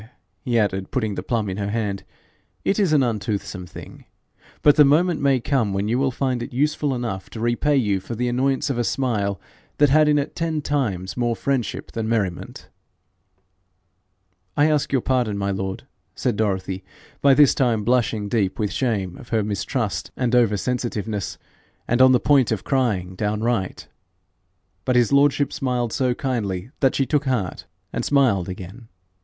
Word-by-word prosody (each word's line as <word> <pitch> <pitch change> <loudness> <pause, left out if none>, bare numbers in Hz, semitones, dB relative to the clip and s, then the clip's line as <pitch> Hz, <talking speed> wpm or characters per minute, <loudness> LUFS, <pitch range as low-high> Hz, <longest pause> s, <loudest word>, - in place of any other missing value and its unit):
he 120 -2 -1
added, 95 -3 0
putting 110 -6 -1
the - - -4
plum 115 -4 -1
in 95 0 -4
her 100 -1 -2
hand, 105 -3 -2 0.6
'it 200 - +1
is 195 -6 +2
an 145 -3 +4
untoothsome 105 -5 -3
thing, - - -11 0.6
but 145 0 +6
the 150 - +7
moment 160 +4 +3
may 140 -2 +3
come 115 -5 0
when 100 +1 -1
you 120 +3 +1
will 135 0 +2
find 130 -1 -1
it 130 - -6
useful 145 +1 0
enough 115 -6 -4
to 115 - -8
repay 120 +6 +1
you 105 -6 +1
for 105 +5 -7
the 125 +2 -1
annoyance 135 +3 0
of 120 - -2
a - - +2
smile 105 -7 -1 0.4
that 145 -2 +4
had 155 +1 +5
in 150 - +4
it 145 +1 -2
ten 165 -2 -1
times 110 -11 -2
more 120 -1 0
friendship 130 -3 -2
than 110 -1 -3
merriment.' 100 -6 -2 1.9
'I 150 +2 +4
ask 150 -2 0
your 135 -3 +1
pardon, 125 -6 0
my 100 0 -1
lord,' 95 0 -4 0.3
said 125 -4 -1
Dorothy, 95 -3 -2 0.4
by 140 -1 +6
this 145 -1 +6
time 120 -5 +1
blushing 115 -3 +1
deep 100 -4 0
with 105 -2 -1
shame 100 -9 -1
of 120 - -13
her 110 -2 +1
mistrust 100 -2 -2
and 125 -1 0
over 115 -4 +4
sensitiveness, 110 -5 -3 0.5
and 120 +2 +2
on 130 0 +8
the 125 - +5
point 135 -3 +3
of 110 -4 -1
crying 105 -10 0
downright. 105 0 -2 1.0
But 125 - 0
his 120 +1 +3
lordship 140 0 +3
smiled 125 -3 -1
so 130 -3 +1
kindly 115 -6 -3
that 135 -2 +2
she 135 - +2
took 145 +1 0
heart 120 -9 -2 0.3
and - - -2
smiled 120 -11 +2
again. 95 +5 -9
120 Hz, 175 wpm, -22 LUFS, 100-135 Hz, 1.9 s, on